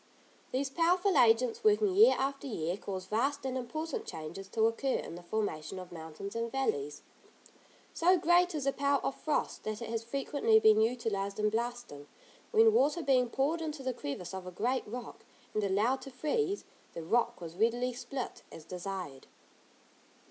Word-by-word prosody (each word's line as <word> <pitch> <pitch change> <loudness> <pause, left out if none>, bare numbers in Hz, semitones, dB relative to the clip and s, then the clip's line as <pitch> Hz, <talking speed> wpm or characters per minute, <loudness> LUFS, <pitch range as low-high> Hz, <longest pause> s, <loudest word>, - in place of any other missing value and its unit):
These 270 +1 -1
powerful 355 +5 +2
agents 230 0 +4
working 420 -2 +4
year 445 +5 +7
after 275 +1 -2
year 175 -7 -2
cause 190 -2 -6
vast 270 +6 -1
and 260 -1 -2
important 315 - -4
changes 160 +5 -7
to 220 +3 0
occur 245 +4 +1
in - - -4
the 175 - -8
formation 180 -3 -3
of 185 -1 -8
mountains 165 +4 -8
and 230 0 -2
valleys. 150 - -2 0.9
So 360 +2 +4
great 350 +1 +3
is 295 - -2
the 275 0 +1
power 280 0 +2
of - - 0
frost, 305 +2 -2
that 215 -1 -3
it 235 - -6
has 230 -1 -1
frequently 235 -2 +2
been 220 0 +6
utilised 220 -4 -1
in 210 0 +1
blasting; 235 -10 -4 0.4
when 445 0 +5
water 305 -2 +3
being 255 -4 +3
poured 295 +7 0
into 305 -3 -4
the 255 -1 -1
crevice 155 +1 -6
of 190 -1 -6
a - - -6
great 240 +8 -1
rock, 240 +2 -7 0.3
and 215 - 0
allowed 210 +7 +1
to 275 - -8
freeze, 385 - -1 0.3
the 165 - -6
rock 235 +7 +1
was 170 -1 -8
readily 240 +5 +1
split, 255 +1 -5
as 155 - -11
desired. 180 -6 -6
240 Hz, 170 wpm, -32 LUFS, 195-280 Hz, 0.9 s, year